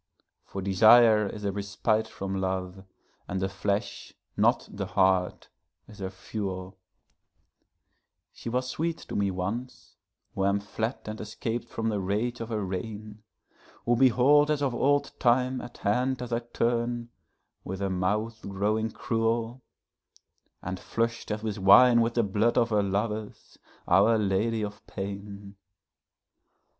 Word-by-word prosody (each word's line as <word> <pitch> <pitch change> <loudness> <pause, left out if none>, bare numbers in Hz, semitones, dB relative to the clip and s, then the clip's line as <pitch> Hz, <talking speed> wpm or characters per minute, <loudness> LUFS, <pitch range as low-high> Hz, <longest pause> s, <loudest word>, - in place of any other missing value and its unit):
For 95 - -6
desire 110 +2 +6
is 105 +1 -7
a 100 - +1
respite 105 +2 -1
from 95 -2 -4
love, 95 0 -3 0.4
and 95 - -2
the 95 - 0
flesh, 100 +1 -3 0.2
not - - +2
the 100 -1 -4
heart, 95 -1 +1 0.4
is 105 -2 -14
her 95 -1 -3
fuel; 95 -1 -6 1.5
She - - -7
was 125 +2 -1
sweet 165 +5 -2
to - - -9
me 100 -1 +1
once, 100 +7 -5 0.4
who 95 - -2
am 100 +1 +2
fled 110 +4 -3
and 110 0 -6
escap'd 115 +2 -4
from 115 0 -2
the 105 -2 -1
rage 105 +6 -1
of 115 - -5
her 105 -3 -2
reign; 105 +3 -6 0.6
Who 120 - +3
behold 135 +4 +5
as 150 -1 +1
of 135 -3 0
old 145 +3 +2
time 125 +1 +2
at 120 - -10
hand 125 +5 0
as 120 -1 -5
I 115 - +2
turn, 120 0 -1 0.5
with 95 +1 -5
her 100 -1 -1
mouth 105 +5 -1
growing 105 +3 -1
cruel, 115 +1 -1 1.0
And 95 0 -4
flush'd 115 -1 -2
as 105 +1 -3
with 110 -2 -3
wine 120 +5 +7
with 115 0 0
the 120 - +3
blood 110 +4 +1
of 120 -1 +2
her 105 -1 +3
lovers, 105 +2 -3 0.3
Our 100 +6 +5
Lady 105 +2 0
of 105 0 -6
Pain. 100 0 -7
110 Hz, 145 wpm, -27 LUFS, 100-120 Hz, 1.5 s, wine